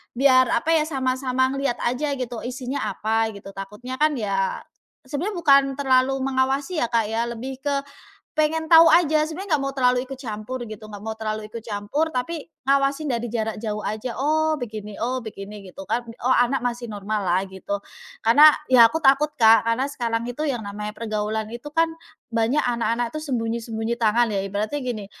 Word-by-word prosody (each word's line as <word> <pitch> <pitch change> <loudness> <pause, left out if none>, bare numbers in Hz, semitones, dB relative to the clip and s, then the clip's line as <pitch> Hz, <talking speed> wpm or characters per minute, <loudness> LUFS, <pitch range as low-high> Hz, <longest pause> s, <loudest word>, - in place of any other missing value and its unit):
biar 255 0 +5
apa 270 +7 +1
ya, 315 -2 +3
sama-sama 260 -2 0
ngeliat 275 -2 -1
aja 280 +4 0
gitu, 245 -3 -4
isinya 255 0 -4
apa 220 +2 0
gitu. 195 0 -10
Takutnya 210 +7 -7
kan 305 0 +3
ya 200 -5 -1 0.4
sebenarnya 295 +10 -3
bukan 280 -5 +6
terlalu 265 -1 +2
mengawasi 270 +5 0
ya 275 - +2
Kak 230 -2 0
ya, 225 +1 0
lebih 240 +3 -6
ke 285 +2 -2 0.6
pengen 315 +1 +1
tahu 330 0 +9
aja. 315 -2 +4
Sebenarnya 375 +5 -7
nggak - - -4
mau 275 - -1
terlalu 250 0 +2
ikut 270 - -6
campur 240 0 -5
gitu, 215 -1 -9
nggak 205 -1 -9
mau 220 - -2
terlalu 215 -1 -4
ikut 230 - -5
campur 220 +9 -1
tapi 295 +3 -3 0.2
ngawasin 275 +2 +2
dari 235 0 -2
jarak 220 -1 -3
jauh 210 -2 -3
aja, 220 +3 -4
"Oh 310 +3 +1
begini 215 -5 -7
oh 250 +3 -2
begini," 210 -2 -8
gitu 195 +1 -10
kan. 225 +5 0 0.2
"Oh 260 - +4
anak 245 +1 +2
masih 240 -1 -3
normal 210 0 -3
lah," 180 +2 +3
gitu. 190 +1 -5 0.5
Karena 290 +7 +9 0.2
ya 235 -3 +8
aku 320 - -2
takut 275 +3 +5
Kak, 225 -1 +7
karena 240 +4 +1
sekarang 235 -4 -2
itu 245 +5 -4
yang 240 -6 -3
namanya 210 +1 -5
pergaulan 215 -1 -2
itu 240 +5 -7
kan 330 +2 +2 0.4
banyak 230 +6 +2
anak-anak 235 0 -1
itu 310 - -4
sembunyi-sembunyi 230 -4 -2
tangan 225 0 +3
ya. 195 - 0
Ibaratnya 205 +8 -3
gini, 240 -5 -4
245 Hz, 180 wpm, -23 LUFS, 220-275 Hz, 0.6 s, tahu